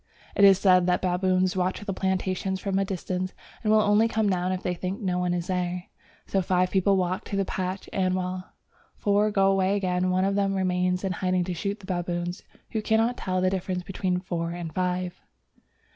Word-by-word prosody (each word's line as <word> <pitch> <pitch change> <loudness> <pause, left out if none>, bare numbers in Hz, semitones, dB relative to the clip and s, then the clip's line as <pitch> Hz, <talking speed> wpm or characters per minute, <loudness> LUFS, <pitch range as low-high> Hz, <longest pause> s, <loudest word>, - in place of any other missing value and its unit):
It 200 - +3
is 195 -1 +8
said 185 -2 +4
that 180 +1 +1
the 185 - +2
baboons 185 +1 +1
watch 185 0 -1
the 200 - -2
plantations 190 0 -1
from 195 0 -1
a - - +2
distance, 185 -1 -3 0.3
and 215 - +2
will 215 0 +6
only 210 +2 +4
come 220 -2 0
down 180 0 0
if 185 0 -3
they 180 - 0
think 185 +3 -4
no 180 -3 -1
one 180 0 0
is 175 -1 -1
there: 180 -1 -2 0.4
so 195 - 0
five 180 0 +1
people 195 0 +3
walk 185 +3 -1
to 200 - -4
the 195 0 +1
patch, 185 +1 -3
and 185 -1 +1
while 185 0 -4 0.4
four 205 +1 +2
go 195 -2 +3
away 195 0 +2
again, 185 -2 0
one 185 +1 +2
of 195 - +1
them 195 -1 +1
remains 180 -1 0
in 190 - 0
hiding 185 0 0
to 180 +1 -3
shoot 200 +4 -3
the - - -11
baboons, 175 0 -3 0.3
who 220 - -1
cannot 225 +3 +2
tell 185 -4 -2
the 185 0 +2
difference 185 -1 -2
between 185 -1 -1
four 170 -2 -3
and 170 -2 -5
five. 180 0 -2
185 Hz, 210 wpm, -26 LUFS, 180-195 Hz, 0.4 s, is